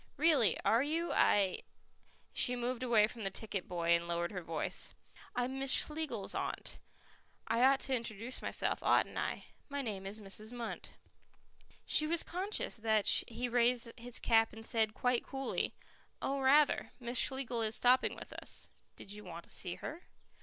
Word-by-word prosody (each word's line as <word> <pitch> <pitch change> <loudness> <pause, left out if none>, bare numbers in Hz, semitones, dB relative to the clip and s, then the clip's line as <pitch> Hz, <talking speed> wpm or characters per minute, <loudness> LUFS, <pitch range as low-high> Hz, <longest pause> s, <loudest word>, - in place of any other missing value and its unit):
"Really. 295 -7 +4
Are 230 +2 +4
you? 325 +4 -1
I 195 -3 +3 0.3
" - - -39 0.3
She 250 - +3
moved 245 0 -3
away 235 -4 +4
from 225 +1 -8
the 195 - -1
ticket 195 -1 -4
boy 170 -1 -2
and 170 0 +3
lowered 170 0 -1
her 185 -3 -5
voice. 165 -1 -2 0.4
"I 245 - +1
am 260 +2 -3
Miss 270 0 -1
Schlegels 310 0 +1
aunt. - - -4 0.7
I 230 +2 +1
ought 270 +1 +5
to 270 - 0
introduce 230 +1 -4
myself, - - -1
oughtn't - - +2
I? - - -3 0.2
My 285 0 -3
name 195 -5 -4
is 205 +3 -7
Mrs. 215 +2 -6
Munt." 240 -2 -5 1.0
She 305 - +3
was 335 +1 +3
conscious 380 - -1
that 220 -2 +1 0.2
he 240 +2 -3
raised 240 0 +2
his 245 0 -4
cap 225 -1 +3
and 225 0 -10
said 220 -2 0
quite 250 -1 +1
coolly, 270 0 -3 0.4
"Oh, 275 +1 -2
rather; 280 +2 +3
Miss 240 0 0
Schlegel 260 -3 +1
is 220 0 0
stopping 250 +1 +3
with - - -10
us. - - -3 0.3
Did 195 - -11
you 210 +1 -8
want 170 -2 -8
to - - -14
see 180 -2 -3
her?" 330 +4 -8
235 Hz, 175 wpm, -34 LUFS, 210-265 Hz, 1.0 s, ought